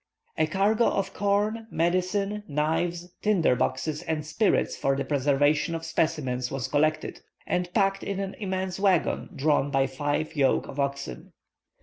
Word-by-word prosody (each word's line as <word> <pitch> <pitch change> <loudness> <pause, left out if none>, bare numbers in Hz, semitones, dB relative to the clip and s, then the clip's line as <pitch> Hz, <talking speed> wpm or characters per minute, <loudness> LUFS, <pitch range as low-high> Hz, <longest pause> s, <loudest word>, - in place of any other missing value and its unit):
A 155 - +2
cargo 205 +7 +2
of 195 -1 -1
corn, 210 +3 0
medicine, 185 +5 0
knives, 170 +4 -1
tinder 195 -11 +3
boxes, 140 +5 -1
and 160 -2 -3
spirits 200 +7 +1
for 135 0 +1
the 140 - -2
preservation 145 +3 +2
of 165 0 -5
specimens 130 -7 -1
was 135 -3 -3
collected, 155 +1 0 0.2
and 180 0 -1
packed 195 -1 +2
in 200 -1 -3
an 195 -1 -3
immense 190 -2 -3
waggon, 195 -4 +1
drawn 145 0 +2
by 135 -1 +2
five 145 +4 -2
yoke 135 -3 +2
of 140 - -8
oxen. 140 - -3
160 Hz, 145 wpm, -27 LUFS, 145-195 Hz, 0.2 s, tinder